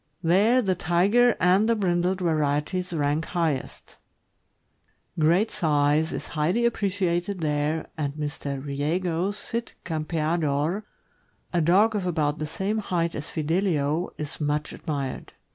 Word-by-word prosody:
There 210 +9 +4
the 190 -2 +2
Tiger 195 +8 +3
and 190 +5 +4
the 230 - +4
brindled 185 -2 0
varieties 160 +2 0
rank 150 -1 0
highest; 160 -7 -3 1.2
great 170 +8 +3
size 150 0 +2
is - - -5
highly 170 +10 +1
appreciated 190 -4 0
there, 150 +1 0
and 140 -2 -1
Mr. 145 -2 -4
Riego's 170 +7 -1
Cid 230 +3 -4
Campea 160 0 -1
dor, 155 +8 0 0.7
a 175 - +2
dog 200 +7 +4
of 195 -3 -1
about 155 -3 0
the 155 - -2
same 195 +7 -2
height 170 -5 -1
as 150 +2 -6
Fidelio, 160 -1 0
is 150 +1 -6
much 150 0 -1
admired. 140 -4 -4
165 Hz, 125 wpm, -25 LUFS, 150-190 Hz, 1.2 s, There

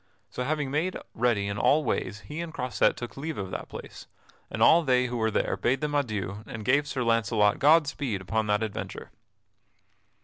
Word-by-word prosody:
So 125 - -3
having 145 0 -1
made 165 +6 -1 0.2
ready 110 -4 +1
in 100 +1 -3
all 155 +2 +4
ways 105 -6 -2
he 150 +8 -6
and 170 -1 -5
Croisette 125 -5 +1
took 120 - -7
leave 155 +3 -4
of 95 -2 -5
that - - -6
place, - - -10 0.4
and - - -5
all 170 - +7
they 125 -4 +2
who 120 -1 -3
were 110 -1 +1
there - - 0
bade 135 +2 0
them 150 -1 -2
adieu 105 -8 -2
and 110 -2 -7
gave 145 +4 +3
Sir 130 -3 -2
Launcelot 110 -3 +2
God 155 +2 +6
speed 135 -8 -3
upon 105 +4 -1
that 105 +1 +1
adventure. 105 -3 -6
125 Hz, 195 wpm, -27 LUFS, 105-145 Hz, 0.4 s, all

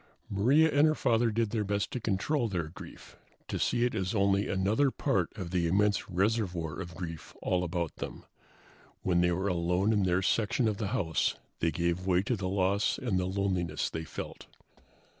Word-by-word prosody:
Maria 135 +11 +4
and 145 +2 +5
her 155 - +2
father 115 -3 +2
did 110 -1 0
their 110 -3 0
best 100 0 -1
to 125 - -3
control 115 +5 0
their 85 -6 -2
grief, 80 - -12 0.3
to - - -3
see 120 - +2
it 125 - -1
as 95 0 -2
only 100 0 +2
another 105 +9 +2
part 100 - 0
of 90 -4 -5
the 90 -2 +1
immense 100 +4 +2
reservoir 90 -5 0
of 85 -1 -8
grief 80 -2 -7
all 90 -1 +1
about 85 -2 -3
them. - - -7 0.8
When 85 -2 +2
they 90 0 +3
were 95 +3 -1
alone 90 +3 +1
in 105 - +2
their 95 0 +2
section 115 +4 +1
of 105 -2 0
the 105 - -2
house 95 -8 0 0.2
they 85 - +2
gave 85 +3 -1
way 90 0 +3
to 120 - 0
the 95 -3 -3
loss 100 +2 +1
and 105 -7 0
the 90 - 0
loneliness 95 -4 -1
they 80 - -4
felt. - - -7
95 Hz, 190 wpm, -30 LUFS, 90-110 Hz, 0.8 s, and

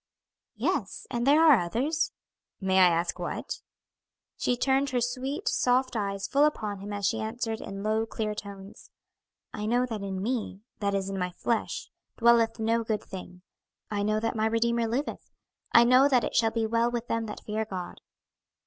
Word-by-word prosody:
"Yes, - - -2
and 240 0 -1
there 300 +3 +6
are 300 -7 +7
others." 245 - -1 0.5
"May 190 -1 +2
I 185 - +8
ask 170 0 0
what?" - - -4 0.7
She 245 - 0
turned 270 +2 +2
her 255 -1 0
sweet, 265 - -3
soft 255 - +2
eyes 200 -2 -2
full 280 +1 +3
upon 215 -9 0
him 200 +2 -7
as 205 -1 -2
she - - +1
answered 225 0 -3
in 195 0 -6
low, 220 +1 0
clear 215 -1 -3
tones, 200 -1 -10 0.6
"'I 210 - -4
know 245 +2 +2
that 225 -4 -5
in 195 -1 -4
me 215 -2 -3 0.2
(that 200 -2 0
is, 195 -1 -1
in 195 - -3
my 180 0 -1
flesh) 225 +6 -2 0.3
dwelleth 230 -1 +4
no 230 +1 +1
good 220 -1 -2
thing.' 180 -1 -10 0.5
'I 205 -1 -1
know 215 +1 +1
that 225 +1 -2
my 220 0 +1
Redeemer 230 +1 +1
liveth.' 250 +6 -3 0.4
'I 235 - +8
know 255 +3 +6
that 255 -4 +3
it - - -3
shall 225 -1 +4
be 225 0 -1
well 230 +2 +2
with 240 0 -3
them 230 -1 -1
that 210 - -8
fear 215 +1 -1
God.'" 185 -4 -7
225 Hz, 185 wpm, -28 LUFS, 200-245 Hz, 0.7 s, I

